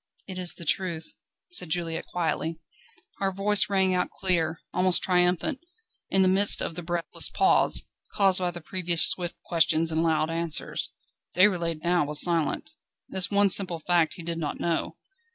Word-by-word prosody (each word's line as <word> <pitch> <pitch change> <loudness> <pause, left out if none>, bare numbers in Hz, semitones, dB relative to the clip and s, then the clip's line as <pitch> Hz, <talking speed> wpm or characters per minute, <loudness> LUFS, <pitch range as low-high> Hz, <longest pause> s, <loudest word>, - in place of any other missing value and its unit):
"It 185 -2 -7
is 180 -1 -2
the 170 - -9
truth," 170 -1 -2 0.4
said 180 - -3
Juliette 165 0 -4
quietly. 165 -1 -3 0.6
Her 195 -1 -1
voice 200 +2 +2
rang 190 -2 +1
out 180 0 -1
clear, 170 -4 -1
almost 185 0 +3
triumphant, 180 - 0 0.5
in 195 0 +2
the - - +3
midst 195 +2 +5
of - - -4
the 175 - -7
breathless 175 0 -2
pause, - - +2 0.3
caused 195 -2 +4
by 180 -1 -1
the 175 0 -9
previous 175 -1 +2
swift 175 -1 -1
questions 165 -1 +1
and 160 0 0
loud 160 -1 0
answers. 165 -1 -3 0.5
Déroulède 170 -4 +1
now 175 -1 +1
was 150 0 +1
silent. 170 - 0 0.4
This 190 -1 0
one 200 -1 +4
simple 180 -3 +5
fact 170 0 0
he 175 - -10
did 165 0 -5
not 150 -3 -4
know. 170 -1 -3
175 Hz, 165 wpm, -26 LUFS, 165-185 Hz, 0.6 s, midst